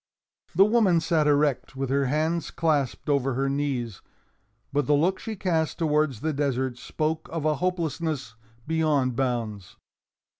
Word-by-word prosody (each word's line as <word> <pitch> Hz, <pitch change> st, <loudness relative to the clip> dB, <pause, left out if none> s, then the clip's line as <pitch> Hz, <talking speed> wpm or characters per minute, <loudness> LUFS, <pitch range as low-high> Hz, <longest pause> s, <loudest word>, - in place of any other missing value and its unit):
The 195 Hz, +3 st, +7 dB
woman 210 Hz, -6 st, +4 dB
sat 160 Hz, -2 st, +1 dB
erect, 145 Hz, -2 st, +1 dB
with 135 Hz, -1 st, -3 dB
her 140 Hz, 0 st, +2 dB
hands 155 Hz, +5 st, 0 dB
clasped 150 Hz, -6 st, 0 dB
over 135 Hz, -3 st, +1 dB
her 135 Hz, +2 st, 0 dB
knees. 135 Hz, -7 st, -2 dB, 0.7 s
But 145 Hz, -2 st, +1 dB
the 145 Hz, -, +4 dB
looks 180 Hz, +6 st, +1 dB
she 225 Hz, -, -5 dB
cast 165 Hz, -5 st, 0 dB
towards 150 Hz, -7 st, +1 dB
the 160 Hz, 0 st, -1 dB
desert 130 Hz, -3 st, -1 dB
spoke 155 Hz, +1 st, -2 dB
of 160 Hz, -2 st, -3 dB
a 155 Hz, -2 st, +2 dB
hopelessness 160 Hz, -7 st, -2 dB, 0.3 s
beyond 150 Hz, -6 st, +1 dB
bounds. 115 Hz, -7 st, -2 dB
150 Hz, 145 wpm, -26 LUFS, 135-160 Hz, 0.7 s, The